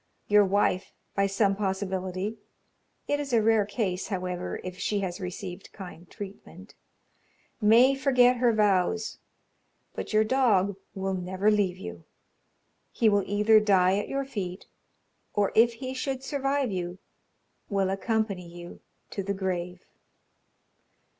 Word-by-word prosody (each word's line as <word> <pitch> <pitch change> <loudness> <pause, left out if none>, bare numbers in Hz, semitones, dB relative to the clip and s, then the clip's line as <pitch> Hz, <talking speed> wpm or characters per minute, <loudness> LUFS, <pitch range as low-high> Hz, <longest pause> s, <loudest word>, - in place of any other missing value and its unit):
Your 210 0 +6
wife, 190 -1 +1 0.2
by 200 0 +2
some 195 0 +2
possibility 190 +1 -2 0.7
(it 290 - +1
is 280 -3 -4
a 230 - +5
rare 220 -2 +3
case, 200 -3 -2
however, 180 -2 -3
if 185 0 -7
she 205 -1 0
has 185 0 -3
received 180 0 -7
kind 180 -3 -10
treatment) 200 -2 -10 0.9
may 235 +5 +6
forget 255 -2 +4
her 240 0 +3
vows, 210 0 +1 0.7
but - - -5
your 215 0 +4
dog 215 -6 +2 0.2
will 190 0 -2
never 190 +3 0
leave 200 -4 +1
you 85 -2 -8 0.9
he 225 - +3
will 205 -1 +2
either 210 +2 +5
die 195 -2 +3
at - - -5
your 275 0 -1
feet, 195 -8 -5 0.7
or 205 -1 +2
if 235 +1 +5
he 255 +2 -6
should 265 0 -3
survive 275 -2 0
you, 180 -1 -3 0.7
will 195 -2 +1
accompany 200 -2 -1
you 175 0 -10 0.3
to 200 - -3
the 200 +1 -2
grave. 180 -1 -3
200 Hz, 135 wpm, -27 LUFS, 185-225 Hz, 0.9 s, Your